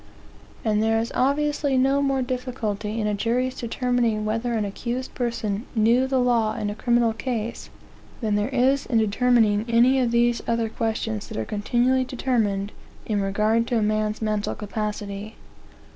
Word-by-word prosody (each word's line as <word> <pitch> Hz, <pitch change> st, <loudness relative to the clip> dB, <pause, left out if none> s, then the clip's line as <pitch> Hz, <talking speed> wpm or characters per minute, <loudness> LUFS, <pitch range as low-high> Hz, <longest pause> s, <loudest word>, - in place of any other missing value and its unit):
And 215 Hz, -1 st, +2 dB
there 225 Hz, 0 st, +2 dB
is 230 Hz, +1 st, -3 dB
obviously 285 Hz, +1 st, +1 dB
no 270 Hz, +2 st, +3 dB
more 270 Hz, -2 st, +1 dB
difficulty 230 Hz, -4 st, -3 dB
in 215 Hz, -, -1 dB
a 210 Hz, -, 0 dB
jury's 245 Hz, +5 st, 0 dB
determining 235 Hz, -3 st, 0 dB
whether 225 Hz, +3 st, -1 dB
an 220 Hz, -2 st, 0 dB
accused 240 Hz, +5 st, -4 dB
person 230 Hz, -3 st, -2 dB
knew 235 Hz, +4 st, +3 dB
the 265 Hz, -1 st, +1 dB
law 230 Hz, -3 st, +2 dB
in 205 Hz, -, -2 dB
a -, -, -3 dB
criminal 235 Hz, 0 st, +2 dB
case, 230 Hz, -1 st, -4 dB, 0.5 s
than 220 Hz, -4 st, -1 dB
there 205 Hz, +2 st, +1 dB
is 265 Hz, +1 st, +2 dB
in 240 Hz, -, +1 dB
determining 220 Hz, -1 st, +3 dB
any 245 Hz, +3 st, +4 dB
of 250 Hz, -2 st, +2 dB
these 235 Hz, 0 st, +2 dB
other 230 Hz, -1 st, 0 dB
questions 220 Hz, -1 st, -2 dB
that -, -, -7 dB
are 110 Hz, -, -2 dB
continually 245 Hz, -, +1 dB
determined 225 Hz, -6 st, -1 dB, 0.3 s
in 210 Hz, -2 st, 0 dB
regard 215 Hz, +4 st, +1 dB
to 240 Hz, -, +1 dB
a 220 Hz, -, +1 dB
man's 215 Hz, +1 st, 0 dB
mental 215 Hz, -1 st, -1 dB
capacity. 210 Hz, 0 st, -5 dB
230 Hz, 160 wpm, -24 LUFS, 215-250 Hz, 0.5 s, any